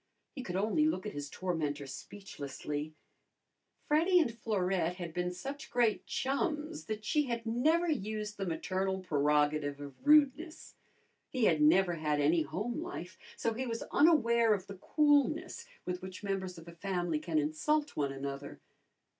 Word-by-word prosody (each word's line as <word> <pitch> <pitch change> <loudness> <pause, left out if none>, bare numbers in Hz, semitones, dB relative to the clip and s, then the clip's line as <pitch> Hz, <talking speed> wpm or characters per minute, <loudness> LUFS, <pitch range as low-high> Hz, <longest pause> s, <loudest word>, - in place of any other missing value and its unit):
He 270 - -6
could 180 -8 -5
only 220 +11 +2
look 215 -10 -1
at 210 - -4
his 145 0 -5
tormentor 150 -6 -2
speechlessly. 150 -2 -6 0.9
Freddy 340 +5 +4
and 235 -9 +1
Florette 185 -6 0
had 175 -3 -6
been 180 +1 -1
such 275 +11 -7
great 235 -3 +1
chums 300 +3 -2
that 215 -1 -5
she 300 +6 +2
had 235 -1 -3
never 310 +10 +2
used 215 - -2
the 195 -1 -3
maternal 190 +3 -1
prerogative 150 -2 +1
of 140 -1 -7
rudeness. 300 +2 +3 0.6
He 255 -4 +1
had 160 -5 +3
never 175 +4 +5
had 150 -2 0
any 155 +3 +3
home 210 - -3
life, 255 - -7 0.2
so 230 - 0
he 255 +3 -3
was 230 -1 -3
unaware 235 -8 +5
of 190 -2 -7
the 195 0 -9
coolness 305 - +2 0.2
with 180 0 -3
which 185 +2 -8
members 190 -3 -3
of 165 0 -12
a - - -8
family 175 -3 -1
can 160 0 -2
insult 285 - 0
one 140 -2 0
another. 140 +1 -6
195 Hz, 155 wpm, -32 LUFS, 160-265 Hz, 0.9 s, never